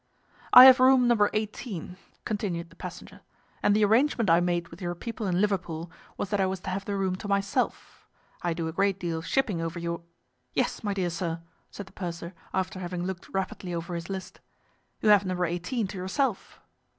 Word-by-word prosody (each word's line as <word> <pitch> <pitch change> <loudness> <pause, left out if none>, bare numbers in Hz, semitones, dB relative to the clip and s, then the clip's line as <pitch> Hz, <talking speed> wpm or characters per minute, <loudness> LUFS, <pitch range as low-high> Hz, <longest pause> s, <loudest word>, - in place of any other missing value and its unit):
"I 250 - +12
have 260 0 +9
room 255 -1 +6
No. 215 -4 +4
18," 210 -4 -4 0.3
continued 180 -6 -3
the - - -17
passenger, - - -9 0.4
"and 205 - +3
the 215 0 +4
arrangement 230 - +3
I 165 - +6
made 175 -1 -1
with 165 +4 -13
your 175 -1 -3
people 230 +2 -5
in 180 -1 +1
Liverpool 175 -5 -1 0.3
was 200 - -4
that 205 -1 +1
I 190 - +2
was 190 0 -3
to 185 - -4
have 195 +1 -3
the 200 - -2
room 190 -1 0
to 205 - -7
myself. 200 0 -2 0.3
I 175 -1 0
do 165 -1 -2
a - - -3
great 195 +2 +1
deal 170 -3 -2
of 165 - -9
shipping 215 -11 +1
over 165 +1 -4
your—" 170 0 -3 0.5
"Yes, - - 0
my 205 -2 -1
dear 180 -3 -1
sir," 170 -1 -3 0.3
said 205 - -8
the 190 - -17
purser, 170 -1 -6 0.2
after 190 0 -2
having 175 -1 -4
looked 185 0 -5
rapidly 190 -2 -3
over 170 +1 -4
his 170 +1 -5
list, 190 -1 -6 0.6
"you 215 - +3
have 205 -1 +7
No. 185 -2 -1
18 180 +8 -1
to 195 - -7
yourself." 210 +4 -2
190 Hz, 200 wpm, -27 LUFS, 175-205 Hz, 0.6 s, I